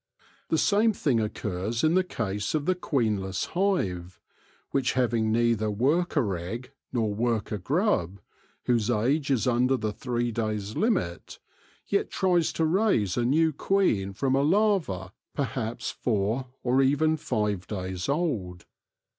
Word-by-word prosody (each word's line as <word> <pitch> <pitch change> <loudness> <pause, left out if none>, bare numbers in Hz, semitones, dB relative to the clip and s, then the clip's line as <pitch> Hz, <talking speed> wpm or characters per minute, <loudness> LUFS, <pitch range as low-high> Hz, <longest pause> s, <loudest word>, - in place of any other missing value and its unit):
The 160 - +2
same 215 +6 +3
thing 135 - +1
occurs 105 +1 -2
in 155 +1 +4
the 185 +1 +4
case 105 - -3
of 150 -2 -1
the 185 - +3
queenless 110 - -1
hive, 95 - -1 0.5
which, 135 -2 +1
having 115 -3 +1
neither 115 -1 +2
worker 135 - +1
egg 115 +10 -6 0.2
nor 110 -4 0
worker 110 -1 -1
grub, 115 - 0 0.5
whose 120 -2 +1
age 130 +6 +1
is 135 -3 +2
under 125 +1 +2
the 110 -3 -2
three 120 0 -2
days' 110 -2 -3
limit, 190 - -1 0.5
yet 200 - 0
tries 180 -4 +2
to 160 - +1
raise 160 - +2
a 120 - +1
new 160 +5 +3
queen 140 - +1
from 130 +6 0
a 135 - +3
larva 155 - +1 0.2
perhaps 120 -2 -3
four 110 +3 -1 0.2
or 130 +2 +3
even 145 +4 +3
five 105 - -2
days 95 -1 -4
old. 115 - -2
120 Hz, 140 wpm, -27 LUFS, 105-155 Hz, 0.5 s, in